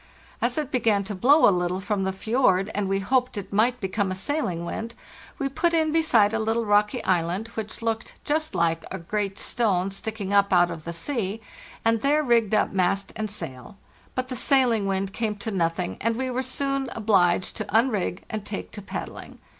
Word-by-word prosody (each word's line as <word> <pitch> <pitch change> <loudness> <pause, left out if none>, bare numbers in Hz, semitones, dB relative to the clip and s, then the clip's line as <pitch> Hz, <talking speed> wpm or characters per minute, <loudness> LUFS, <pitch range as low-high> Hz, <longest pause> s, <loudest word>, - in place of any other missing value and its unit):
As - - 0
it 295 -2 -2
began 220 -5 +2
to 205 +2 -5
blow 275 +11 +5
a 200 - +5
little 180 +1 -1
from 195 -1 -1
the 190 - 0
fjord, 200 -1 +1
and 200 -1 -1
we 195 - +2
hoped 250 +2 +1
it 200 -1 -6
might 235 +4 +2
become 195 0 -1
a - - -2
sailing 185 - -2
wind, 230 +6 -5 0.4
we 275 - -1
put 335 +5 +1
in 315 -1 +2
beside 240 -10 +4
a 225 - +1
little 225 +1 0
rocky 210 0 +2
island, 185 +4 0
which 220 0 -6
looked 225 -1 -2
just 310 +1 -1
like 165 -1 +1
a 190 - -4
great 195 +3 -3
stone* 195 -7 0
sticking 205 0 -4
up 200 0 +4
out 175 -1 +4
of 155 - -8
the 170 - -3
sea, 210 +2 -3 0.5
and 225 -1 +3
there 295 +3 +3
rigged 230 -5 +3
up - - +2
mast 195 +1 0
and 215 -1 -3
sail. 135 -3 -8 0.4
But 255 0 -2
the 255 - -3
sailing 245 -6 +2
wind 195 0 -1
came 220 -1 -1
to 215 +2 -5
nothing, 175 -1 -1
and 230 +1 +1
we 260 +1 -2
were 255 +1 -1
soon 275 +1 -1
obliged 185 -5 +2
to 215 - -3
unrig 215 -4 +1
and 215 -2 -4
take 205 -1 -6
to 210 - -7
paddling. 195 - -7
210 Hz, 200 wpm, -25 LUFS, 190-240 Hz, 0.5 s, blow